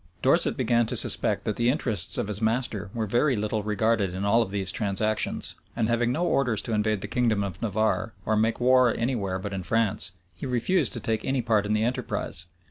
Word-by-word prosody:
Dorset - - +3
began 120 -1 +1
to - - -2
suspect - - +4
that 105 - -2
the 120 +1 +2
interests 115 - +1
of - - -2
his 105 0 -4
master 110 -3 -1
were 115 0 -3
very 120 +6 +1
little 105 0 -2
regarded 105 -2 0
in 95 +2 -3
all 115 +3 +3
these 95 -1 -3
transactions; 110 +1 0 0.2
and 115 -2 0
having 120 0 +1
no 170 +7 -1
orders 125 -9 0
to 115 - -4
invade 105 -1 0
the 100 - -5
kingdom 115 -3 0
of 95 -2 -6
Navarre, 110 +1 -1
or 110 - +1
make 110 +2 0
war 125 0 +4
any 125 +3 -1
where 95 -4 -3
but 100 +1 -6
in 95 - -3
France, 100 0 0 0.2
he 135 - -6
refused 130 +5 +1
to - - -2
take 110 -1 -2
any 135 -2 -1
part 110 -3 +1
in 105 - 0
the 110 0 +1
enterprise. 110 -6 -2
110 Hz, 210 wpm, -25 LUFS, 100-120 Hz, 0.2 s, suspect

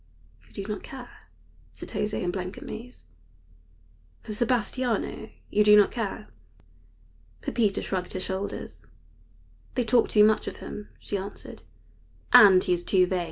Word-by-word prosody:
"You - - -23
do 200 - -4
not 210 0 -4
care," 255 -2 -11 0.5
said - - -9
José, 210 -2 -2
in 175 - 0
blank 185 0 -5
amaze, 240 +3 -9 1.2
"for 215 - -6
Sebastiano? 235 -1 -1 0.2
You 210 - +4
do 210 0 +7
not 205 - +5
care?" 220 -2 -4 1.1
Pepita 215 -5 0
shrugged 185 -2 -3
her 185 - -3
shoulders. 190 +1 -5 0.9
"They 250 - +1
talk 235 +1 +3
too 210 - +5
much 215 0 +3
of - - -4
him," 210 - -8
she 205 - -3
answered, 200 +1 -8 0.7
"and 190 -3 +9
he 180 - +1
is 175 0 -2
too 185 -1 +3
vain. 185 0 -1
210 Hz, 145 wpm, -26 LUFS, 190-225 Hz, 1.2 s, and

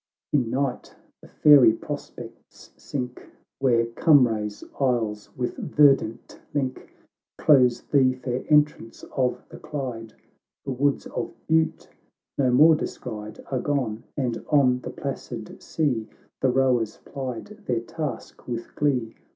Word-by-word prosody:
In 130 -6 +2
night 130 0 -2 0.3
the - - -14
fairy 140 -7 +6
prospects - - -9
sink, 125 -3 -6 0.3
Where 120 -4 +3
Cumray's 115 -5 +2 0.2
isles 115 -6 0
with 125 -1 -3
verdant 140 -6 +2
link 130 -3 -3 0.5
Close 125 -5 +4
the 130 -3 +3
fair 125 0 -4
entrance 150 -6 +2
of 125 -2 0
the - - -11
Clyde; 125 -6 -6 0.5
The 135 - -3
woods 140 +2 0
of - - -5
Bute 160 0 +1 0.5
no 130 -2 +2
more 150 +6 +7
descried, 110 -7 -5
Are 130 - 0
gone 125 -6 -2
— - - -51
and 125 -4 -2
on 130 -4 +4
the - - -7
placid 120 -5 -6
sea 125 -9 -1 0.3
The 130 - +2
rowers 125 -4 +1
plied 135 - -7
their 120 -2 0
task 150 +5 -6
with 120 -1 -5
glee. 125 -6 0
130 Hz, 125 wpm, -25 LUFS, 115-140 Hz, 0.5 s, more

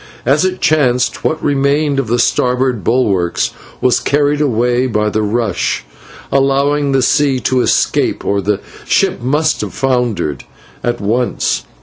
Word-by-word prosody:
As 140 +6 +3
it 185 0 -1
chanced, 125 -5 +1
what 160 - -1
remained 140 0 +1
of 135 - -2
the 120 +2 +1
starboard 125 -2 +1
bulwarks 100 -8 +1 0.3
was 125 - +3
carried 145 +1 +1
away 125 -1 +1
by 105 -3 0
the 110 - 0
rush, 105 - -1 0.5
allowing 140 +1 +1
the 135 -1 +2
sea 140 -2 +2
to 130 -1 +1
escape, - - 0
or 100 0 0
the 100 +1 -1 0.2
ship - - +1
must 150 +5 0
have - - -5
foundered 125 - -1 0.4
at 120 0 -1
once. 115 +5 -1
125 Hz, 140 wpm, -15 LUFS, 115-140 Hz, 0.5 s, As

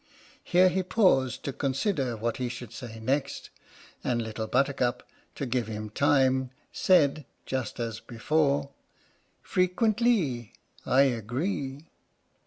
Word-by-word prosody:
Here 185 +1 +5
he 190 +1 0
paused 180 - +2
to 140 - -3
consider 135 - -1
what 115 +2 -2
he 125 -1 -2
should 120 -2 -8
say 115 -2 -8
next, 135 +5 -2 0.5
and 120 -1 0
Little 110 -1 -4
Buttercup 130 -1 0 0.3
(to 140 - -3
give 120 -2 -1
him 105 -1 -5
time) 130 0 +2 0.2
said, 155 -5 +3 0.2
just 130 -4 -3
as 115 -2 -3
before: 140 +3 0 0.7
Frequentlee, 185 - +1 0.3
I 130 - +5
agree. 135 - -2
130 Hz, 115 wpm, -28 LUFS, 120-150 Hz, 0.7 s, Here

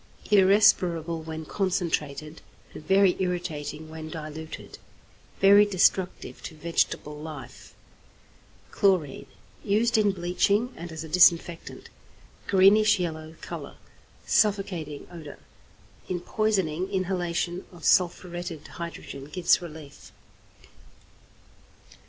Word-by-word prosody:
= - - -18
Irrespirable 180 -5 +4
when 160 0 -7
concentrated, 160 -5 -2 0.3
and 155 - -11
very 195 0 +4
irritating 165 -4 -3
when 155 0 -8
diluted. 155 0 -8 0.6
Very 200 +1 +7
destructive 190 -2 0
to 160 - -8
vegetable 150 -2 -1
life. 145 -6 -10 1.0
=Chlorine.= 185 -8 +1 0.4
Used 220 +3 +2
in 205 -2 +3
bleaching, 195 +6 0
and 170 +1 -8
as 160 0 -6
a - - -8
disinfectant. 170 0 +2 0.6
Greenish 205 +2 +5
yellow 160 -2 -4
colour, - - -7 0.5
suffocating 185 -8 0
odour. 155 -4 -10 0.7
In 180 -1 -1
poisoning, 190 -3 -1
inhalation 180 -2 -2
of 175 -3 -11
sulphuretted 175 -2 0
hydrogen 170 -5 -8
gives 175 +5 +2
relief. 155 -4 -11
175 Hz, 95 wpm, -26 LUFS, 160-190 Hz, 1.0 s, Very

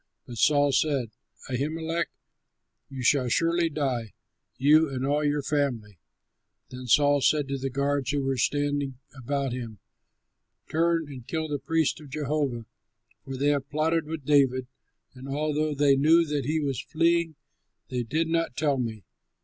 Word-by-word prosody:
But 120 -2 -8
Saul 145 -1 +4
said, 135 -4 +1 0.4
"Ahimelech, 160 +6 -2 0.8
you 135 -2 -6
shall 125 -1 +3
surely 165 +5 +2
die, 130 -8 -2 0.4
you 150 +3 +5
and 130 -1 -3
all 145 +2 +1
your 145 -1 0
family." 120 - -2 0.7
Then 125 0 -8
Saul 145 +3 +4
said 145 0 +2
to 140 0 -2
the 135 +1 -2
guards 140 0 -1
who 145 -1 0
were 135 0 0
standing 145 0 0 0.2
about 135 0 -2
him, 115 -4 -6 0.9
"Turn 165 0 +1
and 130 -4 -10
kill 160 -1 -2
the 145 -2 -3
priests 160 +3 0
of 150 - -12
Jehovah, 140 -4 -2 0.6
for 135 -1 -6
they 140 +2 +2
have 140 -2 0
plotted 155 +1 0
with 155 -3 -6
David; 135 -3 +3 0.5
and 130 +1 -10
although 150 +1 -1
they 140 -1 +4
knew 160 +5 +5
that 145 -4 -2
he 155 +3 0
was 140 -4 -2
fleeing, 165 0 +1 0.5
they 125 -1 -2
did 155 +8 -1
not 165 -4 -1
tell 145 -3 +1
me." 110 -4 -4
145 Hz, 155 wpm, -27 LUFS, 130-155 Hz, 0.9 s, you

